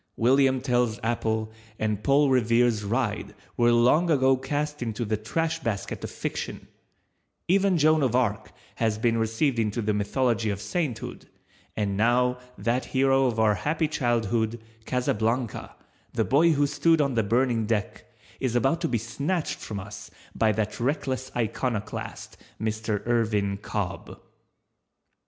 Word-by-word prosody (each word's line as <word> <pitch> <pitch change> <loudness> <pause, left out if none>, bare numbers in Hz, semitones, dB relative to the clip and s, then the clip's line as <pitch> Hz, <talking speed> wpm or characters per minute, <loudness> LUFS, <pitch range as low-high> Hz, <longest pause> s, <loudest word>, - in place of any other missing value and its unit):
William 130 +2 +3
Tell's 120 -3 +1
Apple 110 -1 -1 0.3
and 105 -1 -2
Paul 140 0 +4
Revere's 115 -2 +3
Ride 105 -2 -2 0.2
were 120 0 +4
long 125 +9 +4
ago 135 -3 +4
cast 145 +2 -3
into 115 0 -3
the 110 +1 0
trash 160 +10 -2
basket 110 -6 -4
of - - -4
Fiction; - - -5 0.8
even 190 0 +3
Joan 155 0 +4
of 125 -3 +1
Arc 110 -4 0 0.3
has 110 -2 +1
been 115 +1 +1
received 115 +3 0
into 110 0 0
the 105 -1 0
mythology 110 +2 0
of 100 -1 -2
Sainthood, 140 - -4 0.5
and 100 -2 0
now 125 +4 +2 0.2
that 120 +2 0
hero 135 0 +3
of 115 -2 -1
our 110 -1 +4
happy 155 - 0
childhood, 115 -4 0 0.3
Casablanca, 120 -1 -1 0.4
the 115 -2 +1
boy 160 +5 +4
who 145 -1 +2
stood 160 +3 +2
on 140 -3 +1
the 115 - +2
burning 115 +1 +1
deck, 105 -5 -2 0.3
is 130 -3 -1
about 135 +8 +2
to 165 - +1
be 120 - 0
snatched 140 - -2
from 105 -2 -5
us 100 +2 -9 0.2
by 110 -1 +2
that 105 0 -2
reckless 130 0 -2
iconoclast, 115 -2 -3 0.2
Mr. 110 -1 -2
Irvin 110 -4 +1
Cobb. - - -5
120 Hz, 140 wpm, -26 LUFS, 110-135 Hz, 0.8 s, Paul